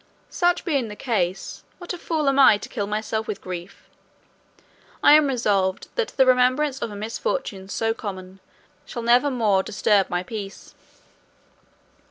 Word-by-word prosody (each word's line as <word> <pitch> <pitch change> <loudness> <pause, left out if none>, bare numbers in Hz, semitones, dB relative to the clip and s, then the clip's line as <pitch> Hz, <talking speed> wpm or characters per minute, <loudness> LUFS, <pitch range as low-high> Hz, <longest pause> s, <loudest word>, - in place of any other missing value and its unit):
Such 350 0 +1
being 280 -9 0
the 210 - -8
case, 200 -7 -2
what 350 0 -6
a - - -6
fool 315 -4 -2
am 275 0 +2
I 240 -6 +7
to - - -9
kill 205 -5 -3
myself 220 +1 -3
with - - -4
grief? 180 0 -8 1.2
I - - +8
am 305 -1 +6
resolved 200 -7 0
that 475 -2 -1
the 265 - +6
remembrance 255 +2 +2
of - - -2
a 205 - -8
misfortune 220 - -4
so 225 +2 -1
common 190 -4 -8 0.4
shall 235 - -7
never 245 +5 +4
more 215 -7 +2
disturb 200 0 +1
my 175 0 -2
peace." 200 0 -8
225 Hz, 155 wpm, -23 LUFS, 200-275 Hz, 1.2 s, I